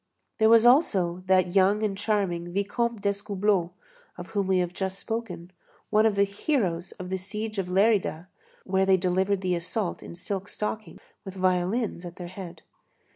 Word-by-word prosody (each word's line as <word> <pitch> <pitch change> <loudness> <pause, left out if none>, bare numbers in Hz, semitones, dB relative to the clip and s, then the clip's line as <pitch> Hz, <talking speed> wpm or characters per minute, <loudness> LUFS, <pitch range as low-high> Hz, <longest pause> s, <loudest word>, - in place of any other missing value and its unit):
There 220 0 +5
was 230 0 +6
also 195 - +3
that 185 -2 +3
young 200 +3 +4
and 205 -2 0
charming 195 -5 -1
Vicomte 210 +4 -1
d'Escoubleau, 200 -2 0 0.5
of 175 0 -8
whom 200 -3 -1
we 190 -1 +3
have 180 -1 -1
just 190 0 -3
spoken, 225 -6 -5 0.4
one 215 +1 +5
of 215 - 0
the 200 - +4
heroes 200 - -1
of 185 0 -8
the 190 - 0
siege 210 +3 -5
of 190 - -2
Lérida, 190 -3 +2 0.4
where 190 0 +1
they 190 -1 +5
delivered 190 +2 0
the 185 -1 0
assault 175 +3 -2
in - - -9
silk 195 +2 -4
stockings, 215 +1 -5 0.2
with 195 -2 -8
violins 185 +2 0
at 175 -1 -8
their 175 -1 -8
head. 180 -3 -9
190 Hz, 170 wpm, -26 LUFS, 180-210 Hz, 0.5 s, was